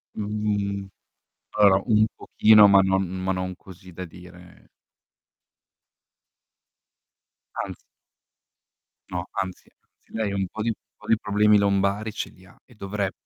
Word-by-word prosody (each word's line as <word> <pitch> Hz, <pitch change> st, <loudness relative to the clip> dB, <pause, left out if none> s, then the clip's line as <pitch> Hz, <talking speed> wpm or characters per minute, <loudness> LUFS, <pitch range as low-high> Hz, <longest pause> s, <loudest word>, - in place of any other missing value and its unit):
Mhmm, 105 Hz, -2 st, -2 dB, 0.6 s
allora 100 Hz, -2 st, +4 dB
un 110 Hz, -2 st, +4 dB
pochino 105 Hz, -1 st, +5 dB
ma 100 Hz, -1 st, +6 dB
non 95 Hz, 0 st, +2 dB
ma 95 Hz, +1 st, -2 dB
non 90 Hz, 0 st, -3 dB
così 95 Hz, -1 st, -14 dB
da 90 Hz, +2 st, -7 dB
dire 90 Hz, +1 st, -15 dB, 3.0 s
Anzi -, -, -7 dB, 1.3 s
No 90 Hz, -1 st, -4 dB
anzi, 95 Hz, -2 st, -5 dB
anzi, -, -, -31 dB
lei 110 Hz, -2 st, -1 dB
ha -, -, -3 dB
un 95 Hz, -1 st, -1 dB
po' 110 Hz, -, -7 dB
di 115 Hz, 0 st, 0 dB, 0.2 s
po' -, -, -16 dB
di 115 Hz, -, +4 dB
problemi 105 Hz, 0 st, +3 dB
lombari 100 Hz, +2 st, +1 dB
ce -, -, -5 dB
li 95 Hz, -, -20 dB
ha 90 Hz, -, -19 dB
e 125 Hz, -, -20 dB
dovre 100 Hz, -1 st, -3 dB
100 Hz, 130 wpm, -24 LUFS, 95-105 Hz, 3.0 s, ma